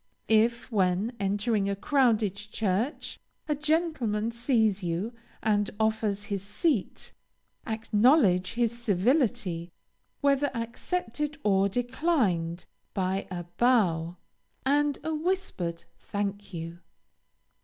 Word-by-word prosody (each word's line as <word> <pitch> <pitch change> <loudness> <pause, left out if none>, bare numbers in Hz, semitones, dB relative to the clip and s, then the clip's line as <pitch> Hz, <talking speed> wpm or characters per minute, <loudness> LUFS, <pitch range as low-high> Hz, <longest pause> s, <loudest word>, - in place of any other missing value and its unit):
If, 230 +3 +3
when 195 +3 +1
entering 200 +1 0
a 200 - 0
crowded 225 -4 +2
church, 210 - -2 0.3
a 300 - +2
gentleman 295 -8 0
sees 230 -4 +1
you 180 +6 -2 0.3
and 205 -2 +2
offers 220 -2 0
his 200 -1 -3
seat, 210 - -1 0.5
acknowledge 220 - +3
his 235 -1 +1
civility, 215 - +1 0.5
whether 280 0 +3
accepted 285 +4 -3
or 195 -1 +3
declined, 225 - 0 0.3
by 190 0 -1
a 175 -2 -4 0.2
bow, 180 -9 +3 0.5
and 290 +1 +2
a 320 - -2
whispered 310 - -2 0.2
"thank 205 0 -4
you." 165 -1 -6
220 Hz, 100 wpm, -28 LUFS, 195-255 Hz, 0.5 s, If